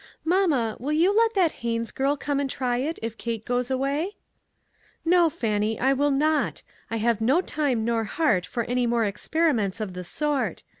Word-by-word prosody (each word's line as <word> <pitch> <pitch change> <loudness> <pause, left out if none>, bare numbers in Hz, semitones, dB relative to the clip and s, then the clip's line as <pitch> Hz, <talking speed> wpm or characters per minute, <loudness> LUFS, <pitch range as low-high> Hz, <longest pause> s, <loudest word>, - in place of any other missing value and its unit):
" - - -44
Mamma, 285 - +2
will 280 +6 -2
you 350 +6 +3
let 455 0 +3
that 360 -5 +3
Haines 230 -1 -2
girl 275 +2 0
come 285 0 -1
and 280 -1 -1
try 250 -2 -1
it, 295 +6 -2
if 225 0 -5
Kate 230 -2 -4
goes 245 0 -1
away? 280 +9 -1 0.4
" - - -43 0.3
"No, 345 0 +5
Fannie, 215 -5 -1
I 265 +2 +3
will 285 +2 +2
not. 300 +3 +1 0.3
I 225 - -2
have 225 0 +1
no 260 +9 +3
time 285 -10 -1
nor 230 -1 0
heart 220 - +1
for 235 -2 -2
any 245 +1 0
more 235 -1 +2
experiments 225 - 0
of 210 -4 -4
the 180 0 -6
sort. 295 - -1
260 Hz, 195 wpm, -25 LUFS, 230-305 Hz, 0.4 s, No